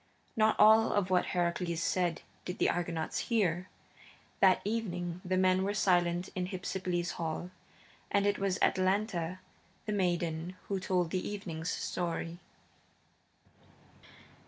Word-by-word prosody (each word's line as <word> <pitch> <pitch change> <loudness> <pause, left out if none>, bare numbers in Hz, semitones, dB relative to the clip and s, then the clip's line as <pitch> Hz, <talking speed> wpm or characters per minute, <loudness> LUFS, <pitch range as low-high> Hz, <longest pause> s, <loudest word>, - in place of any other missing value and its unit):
Not 220 0 +4
all 220 +1 +6
of 195 -3 +1
what 180 - +3
Heracles 170 -1 -1
said 175 -3 0 0.2
did 180 - -5
the - - +3
Argonauts 170 -2 -2
hear. 185 -6 +1 0.7
That 190 -1 +6
evening 180 -5 -2
the 185 0 0
men 185 0 +3
were 200 +1 -1
silent 175 -2 +2
in 180 -1 -2
Hypsipyle's 180 -2 -2
hall, 165 +2 -3 0.6
and 200 0 +2
it 205 0 +1
was 195 -1 0
Atalanta, 185 -2 +1 0.4
the 210 - -2
maiden, 175 -2 -1
who 195 -1 0
told 180 -2 0
the 185 - -2
evening's 175 -5 -4
story. 170 -1 -3
180 Hz, 125 wpm, -32 LUFS, 175-195 Hz, 0.7 s, all